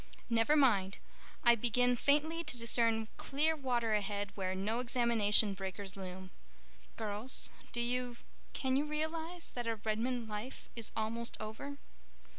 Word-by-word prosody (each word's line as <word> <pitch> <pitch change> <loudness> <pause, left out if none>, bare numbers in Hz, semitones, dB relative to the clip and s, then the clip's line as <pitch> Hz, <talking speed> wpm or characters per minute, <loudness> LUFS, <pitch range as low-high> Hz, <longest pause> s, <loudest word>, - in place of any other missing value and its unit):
"Never 230 +6 +4
mind—I 235 -2 +2
begin 245 +2 +2
faintly 300 +6 +2
to 285 -5 0
discern 230 -1 +3
clear 310 +4 +1
water 245 -6 0
ahead 205 -1 -1
where 190 -2 -2
no 210 +5 -1
examination 230 -4 +3
breakers 195 +1 -5
loom. 185 -1 -7 0.7
Girls, 220 +3 0 0.2
do 240 - 0
you—can 250 +2 -2
you 290 - +1
realize 320 +3 -3
that 240 -1 -4
our 230 - +1
Redmond 230 +2 -1
Life 215 +5 -6
is 230 -2 -3
almost 230 +2 -2
over?" 220 +7 -6
235 Hz, 125 wpm, -34 LUFS, 210-260 Hz, 0.7 s, Never